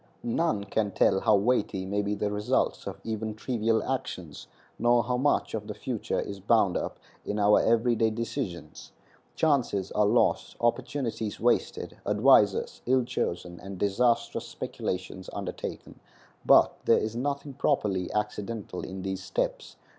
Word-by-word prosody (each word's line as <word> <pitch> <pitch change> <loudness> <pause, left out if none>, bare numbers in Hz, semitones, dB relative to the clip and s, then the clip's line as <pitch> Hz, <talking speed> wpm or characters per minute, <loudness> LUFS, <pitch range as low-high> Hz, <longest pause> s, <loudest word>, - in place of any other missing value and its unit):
None 120 -2 0
can 100 +1 -1
tell 95 - +3
how 110 0 +4
weighty 100 -3 +1
may 100 +2 0
be 105 0 -1
the 105 0 -1
results 105 0 0
of - - -6
even 110 -1 -3
trivial 115 -1 0
actions, 90 - -4 0.3
nor 120 +1 +4
how 125 +2 -1
much 135 +4 +1
of - - -4
the - - -5
future - - -3
is 100 -1 -5
bound 100 -2 +3
up - - -3 0.3
in 105 - -3
our 105 0 +5
every 115 +1 +3
day 110 0 +2
decisions. 110 - -5 0.4
Chances 130 - +1
are 105 -1 +3
lost, 115 +3 +2
opportunities 120 -3 -1
wasted, 120 +2 0
advisers 105 -1 +3
ill 130 0 +4
chosen, 90 -7 -3
and 95 -1 -8
disastrous 115 +5 +1
speculations 95 0 -5
undertaken, - - -6 0.5
but - - +6
there - - +5
is 110 +1 -2
nothing 140 +3 -3
properly 95 -7 0
accidental 105 -2 -3
in 95 0 -6
these 95 -1 -3
steps. 95 - -3
110 Hz, 145 wpm, -28 LUFS, 100-120 Hz, 0.5 s, but